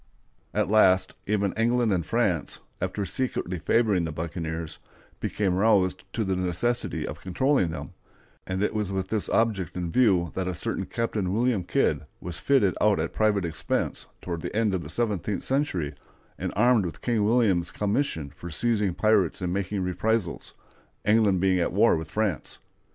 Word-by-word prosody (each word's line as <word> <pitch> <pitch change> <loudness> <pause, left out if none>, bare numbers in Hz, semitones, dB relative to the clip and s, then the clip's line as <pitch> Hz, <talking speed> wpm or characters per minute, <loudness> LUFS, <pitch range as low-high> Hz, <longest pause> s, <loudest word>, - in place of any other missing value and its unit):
At 105 -3 0
last 95 -3 +4
even 100 -1 +1
England 115 -1 +2
and 90 -2 0
France, 100 -7 0 0.2
after 95 +2 -2
secretly 90 -4 -2
favoring 105 -1 +2
the 80 - -3
buccaneers, 80 0 -5 0.4
became 100 -3 0
roused 95 -2 +2
to 115 - 0
the 95 -2 0
necessity 90 +7 -1
of - - -7
controlling 115 - +1
them, 80 - -6 0.5
and 95 +2 -1
it 105 - 0
was 105 -3 -2
with 95 -1 -2
this 110 -2 -1
object 100 -7 0
in 85 -2 -3
view 95 -9 +3
that 95 -1 -2
a 90 - -2
certain 95 +2 -3
Captain 110 -5 -2
William 115 -2 +1
Kidd - - +1 0.2
was 90 0 -6
fitted 125 -10 +3
out 105 -4 +4
at 80 - -2
private 105 -4 +2
expense 80 -1 -2 0.2
toward 85 -2 -4
the - - -5
end 110 -2 +2
of 95 - 0
the - - -8
seventeenth 105 -4 -1
century, 95 - -1 0.4
and - - -4
armed 120 +1 +4
with 85 - -6
King 115 -4 +1
William's 105 -6 +2
commission 100 - -1
for 85 - -8
seizing 105 0 +1
pirates 105 -6 +2
and 90 -2 -2
making 100 0 -2
reprisals, 90 +1 -1 0.5
England 105 -3 +4
being 95 0 +2
at 85 - 0
war - - +5
with 80 0 -5
France. 105 - -2
95 Hz, 165 wpm, -26 LUFS, 90-110 Hz, 0.5 s, war